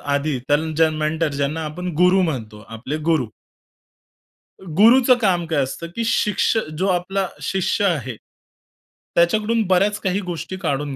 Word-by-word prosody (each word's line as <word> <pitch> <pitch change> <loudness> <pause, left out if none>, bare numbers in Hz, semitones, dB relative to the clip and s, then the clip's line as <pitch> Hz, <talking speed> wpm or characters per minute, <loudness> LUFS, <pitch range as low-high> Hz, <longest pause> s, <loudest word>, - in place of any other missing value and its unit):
आधी, 145 -1 -1
त्या 145 - +4 0.2
ज्यां 160 0 +3
मेंटर 155 +1 -1
ज्यांना 140 +3 -2
आपण 180 +4 -6
गुरु 180 +1 +5
म्हणतो 115 -11 -4
आपले 115 +7 -5
गुरु. 155 -6 +2 1.3
अ, - - -15
गुरूच 240 +5 +6
काम 180 -5 +1
काय 155 -4 +1
असतं? 135 +6 -6
की 230 - -2
शिक्ष 220 0 +1 0.2
जो 190 - +1
आपला 190 +1 -1
शिष्य 190 +1 0
आहे, 130 - -1 1.0
त्याच्याकडून 215 +6 +2
बऱ्याच 200 +3 +2
काही 190 -1 -1
गोष्टी 180 +3 -6
काढून 145 -5 -2
170 Hz, 140 wpm, -21 LUFS, 145-195 Hz, 1.3 s, गुरूच